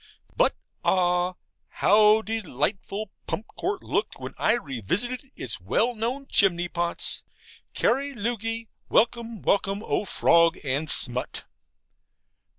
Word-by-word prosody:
But - - +3 0.3
ah, 180 0 +2 0.3
how 215 +1 +4
delightful 205 - -2 0.2
Pump 215 - -3
Court 385 +1 -2
looked - - -2
when - - -7
I 215 - +3
revisited 235 - -2
its 115 -6 -4
well 215 - +1
known 240 +5 -3
chimney 175 -7 +2
pots! 170 0 -1 0.5
CARI 275 +3 +1
LUOGHI. 225 0 -2 0.2
Welcome, 230 -1 +1
welcome, 200 +1 +1
O - - 0
fog 170 -3 +4
and 145 +3 -1
smut! 125 -2 0
210 Hz, 110 wpm, -26 LUFS, 170-230 Hz, 0.5 s, how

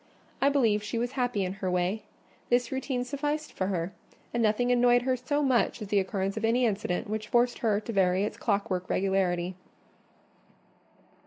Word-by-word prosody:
I 275 - +5
believe 230 -7 +2
she 210 +3 -4
was 240 +2 -1
happy 245 -7 0
in 185 - -3
her 185 - 0
way: 180 +4 0 0.5
this 245 -1 +2
routine 265 -1 -2
sufficed 295 +3 -3
for 185 - -1
her; 180 -1 -2 0.4
and 235 - 0
nothing 230 +3 +2
annoyed 245 0 +4
her 260 0 +1
so 290 +4 -1
much 255 -3 +2
as 210 -3 -7
the 205 - +3
occurrence 195 0 -2
of 220 - -3
any 240 +3 +3
incident 200 -5 -1
which 215 0 -3
forced 240 +1 +2
her 215 -5 +2
to 230 - -6
vary 190 -1 +3
its 210 - -2
clockwork 200 -4 -1
regularity. 185 -2 +1
220 Hz, 175 wpm, -28 LUFS, 195-245 Hz, 0.5 s, I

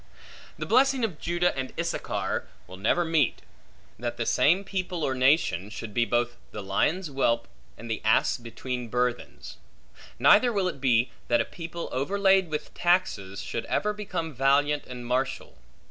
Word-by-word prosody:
The - - -4
blessing 270 -1 +3
of 180 -9 -6
Judah 175 +1 0
and 130 -1 -4
Issachar - - -2 0.2
will 95 +1 -11
never 140 - +1
meet; 160 -6 +1 0.6
that 120 0 -3
the 115 - -2
same 180 +11 +3
people, 185 -4 -3
or 135 - +1
nation, 130 - +2
should 110 -1 -7
be 120 +1 +2
both 120 0 0
the 105 - -7
lion's 150 - 0
whelp 120 -4 +1 0.3
and 115 - -9
the 115 - -3
ass 110 +1 +3
between 125 +1 -5
burthens; 125 +1 -3 0.6
neither 245 +3 +6
will 200 -4 0
it 140 -7 -5
be, 125 -2 +3 0.2
that 120 - +3
a - - +1
people 170 0 -7
overlaid 190 +6 +2
with 150 -1 -4
taxes, 105 - 0
should 115 - -4
ever 210 0 0
become 185 -6 -4
valiant 140 +3 +2
and 125 -1 -8
martial. 130 +2 -2
135 Hz, 160 wpm, -27 LUFS, 120-175 Hz, 0.6 s, neither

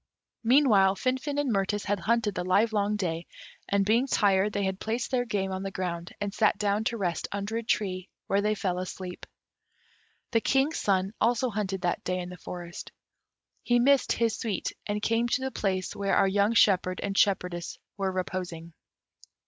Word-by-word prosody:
Meanwhile 225 -7 +5
Finfin 260 +6 -1
and 275 -5 +1
Mirtis 200 +1 0
had 205 -1 0
hunted 225 +1 +1
the 180 - -3
livelong 205 +2 +2
day, 170 -4 -3 0.4
and, 200 0 +2
being 230 +6 +3
tired, 200 -4 +3
they 200 0 -1
had 190 0 -2
placed 230 +2 -2
their 245 -2 +1
game 195 -4 -1
on 190 0 -3
the 195 - -3
ground, 175 -3 -4
and 205 -1 -3
sat 215 -2 +3
down 205 +1 +1
to 235 - -1
rest 175 -5 -2
under 200 +2 -3
a - - -1
tree, 190 -4 -1 0.2
where 200 +1 +1
they 210 +1 +1
fell 180 -3 -1
asleep. 185 0 -6 1.0
The 230 -2 +3
King's 270 +6 +1
son 195 0 +1
also 240 +2 +2
hunted 195 -3 -2
that 175 -1 -1
day 180 0 -1
in 180 -1 -4
the 180 - -9
forest. 175 -1 -8 0.7
He 240 - +2
missed 275 +2 +4
his 230 -1 +1
suite, 215 -5 -2 0.2
and 210 0 -2
came 230 +1 +2
to 250 +2 0
the 265 0 -2
place 190 -5 -2
where 200 -1 0
our - - +4
young 200 +3 +2
shepherd 185 -5 +3
and 195 -1 -2
shepherdess 180 -4 +1 0.2
were 195 -1 -1
reposing. 180 -3 -4
200 Hz, 180 wpm, -28 LUFS, 185-225 Hz, 1.0 s, Meanwhile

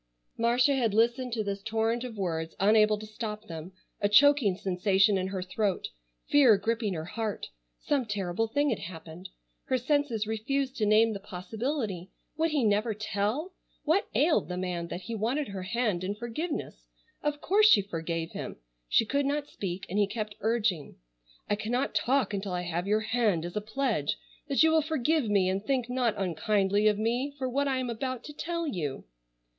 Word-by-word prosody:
Marcia 245 +4 +3
had 235 -6 +1
listened 240 +3 +2
to 225 -2 -1
this 200 -1 -3
torrent 225 +2 0
of 240 -4 -7
words 165 -4 -2
unable 215 +1 +5
to 215 - -8
stop 215 0 -6
them, 165 -1 -8 0.3
a 205 - +2
choking 265 -3 +5
sensation 195 +2 +2
in 190 -1 0
her 190 -1 -3
throat, 195 +1 -1 0.4
fear 260 -8 +6
gripping 220 -1 -1
her 160 0 -4
heart. 215 +3 -4 0.3
Some 275 -5 -1
terrible 205 +1 -1
thing 285 +4 +1
had 220 - -1
happened. 170 +1 -9 0.4
Her 260 - +1
senses 255 -4 0
refused 260 +5 -1
to 215 - +1
name 220 +1 +5
the 200 - -5
possibility. 205 - -4 0.3
Would 320 +2 +1
he 300 -4 +1
never 215 +1 +2
tell? 215 - -2 0.3
What 325 +6 +2
ailed 300 - +3
the 180 - -3
man 180 -2 -3
that 175 - -5
he 210 +6 -6
wanted 240 +6 -1
her 195 -1 -5
hand 190 -1 -1
in 200 +2 -2
forgiveness? 235 - -5 0.3
Of 295 0 -1
course 420 +7 +4
she 205 - +6
forgave 165 -3 -4
him. - - -6 0.3
She - - +4
could 280 +4 0
not 290 +1 -1
speak, 185 -1 -5
and 200 +4 -1
he 205 - +4
kept 210 0 -4
urging. 215 -8 0 0.5
"I - - +1
cannot 235 +6 -1
talk 245 +3 +1
until 195 -1 -3
I 180 0 -2
have 175 +2 -3
your 215 +1 +2
hand 220 -7 +1
as 175 - -7
a 210 - 0
pledge 220 - -1 0.3
that 280 +1 +3
you 320 - +5
will 320 0 +4
forgive 310 -3 0
me 200 -3 +3
and 190 +2 -1
think 250 0 -1
not 250 -3 +1
unkindly 195 +3 +1
of 210 -1 +3
me 245 +6 -1
for 260 -2 -2
what 280 +3 0
I 265 -1 +1
am 255 -2 -2
about 255 +2 -4
to 295 - -9
tell 335 +2 -3
you." 155 - -3
215 Hz, 185 wpm, -29 LUFS, 195-255 Hz, 0.5 s, fear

